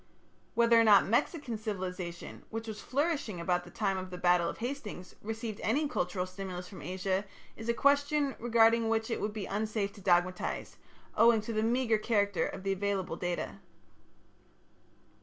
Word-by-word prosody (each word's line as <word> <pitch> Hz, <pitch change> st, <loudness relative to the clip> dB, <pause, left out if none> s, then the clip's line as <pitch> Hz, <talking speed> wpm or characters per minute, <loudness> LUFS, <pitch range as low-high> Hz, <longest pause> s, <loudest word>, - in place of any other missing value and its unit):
Whether 235 Hz, 0 st, +5 dB
or -, -, +6 dB
not 210 Hz, -3 st, +7 dB
Mexican 235 Hz, -, 0 dB
civilization, 185 Hz, -4 st, -5 dB
which 225 Hz, 0 st, -5 dB
was 215 Hz, -1 st, -6 dB
flourishing 280 Hz, -, -1 dB
about 175 Hz, +1 st, 0 dB
the -, -, -11 dB
time 195 Hz, -3 st, -1 dB
of 185 Hz, 0 st, -6 dB
the 180 Hz, -, -7 dB
battle 175 Hz, -1 st, +3 dB
of -, -, -6 dB
Hastings, 230 Hz, -7 st, -5 dB
received 220 Hz, 0 st, -5 dB
any 290 Hz, +7 st, +1 dB
cultural 180 Hz, -6 st, -1 dB
stimulus 185 Hz, -1 st, -6 dB
from 190 Hz, -, -10 dB
Asia 190 Hz, +2 st, -1 dB, 0.3 s
is 225 Hz, +1 st, -7 dB
a -, -, +4 dB
question 285 Hz, +1 st, +2 dB
regarding 230 Hz, -1 st, +4 dB
which 225 Hz, +1 st, 0 dB
it -, -, -1 dB
would 210 Hz, -, -1 dB
be 210 Hz, -2 st, -5 dB
unsafe 210 Hz, 0 st, -2 dB
to 200 Hz, -, -13 dB
dogmatize, 180 Hz, 0 st, 0 dB, 0.4 s
owing 230 Hz, +1 st, +6 dB
to 225 Hz, +2 st, -5 dB
the 215 Hz, -, +1 dB
meagre 230 Hz, -1 st, +2 dB
character 205 Hz, -4 st, +1 dB
of 190 Hz, -, -7 dB
the 195 Hz, -, 0 dB
available 195 Hz, -3 st, -1 dB
data. 175 Hz, +3 st, -3 dB
210 Hz, 165 wpm, -31 LUFS, 185-230 Hz, 0.4 s, not